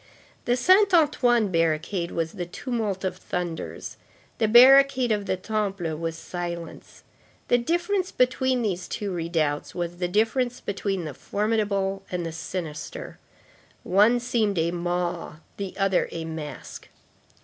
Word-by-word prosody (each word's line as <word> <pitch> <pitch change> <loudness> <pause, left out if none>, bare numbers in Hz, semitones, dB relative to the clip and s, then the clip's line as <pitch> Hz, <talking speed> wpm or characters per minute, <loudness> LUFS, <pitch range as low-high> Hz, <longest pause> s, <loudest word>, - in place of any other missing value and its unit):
The 245 +1 +2
Saint 375 +7 +5
Antoine 245 - +3
barricade 165 +2 0
was 165 -1 -2
the 175 0 -5
tumult 215 -1 -3
of 185 -1 -2
thunders; 175 -3 -5 0.4
the 220 - +3
barricade 260 +1 +7
of 205 -2 -1
the 185 - 0
Temple 195 -5 -2
was 165 +1 -4
silence. 170 -1 -7 0.5
The 245 - +4
difference 345 +8 0
between 255 0 +1
these 185 -4 -2
two 205 -2 -4
redoubts 165 -4 -1
was 175 -1 -3
the 180 0 -1
difference 225 +6 +1
between 195 -3 -3
the 150 - -5
formidable 200 - -1
and 175 -2 -3
the 165 - -3
sinister. 160 -1 -6 0.6
One 210 +6 +4
seemed 230 -5 0
a 165 +1 +1
maw; 175 -2 -2 0.2
the 195 -2 -5
other 195 -2 +1
a 165 -1 -5
mask. 160 -2 -7
195 Hz, 135 wpm, -25 LUFS, 170-240 Hz, 0.6 s, barricade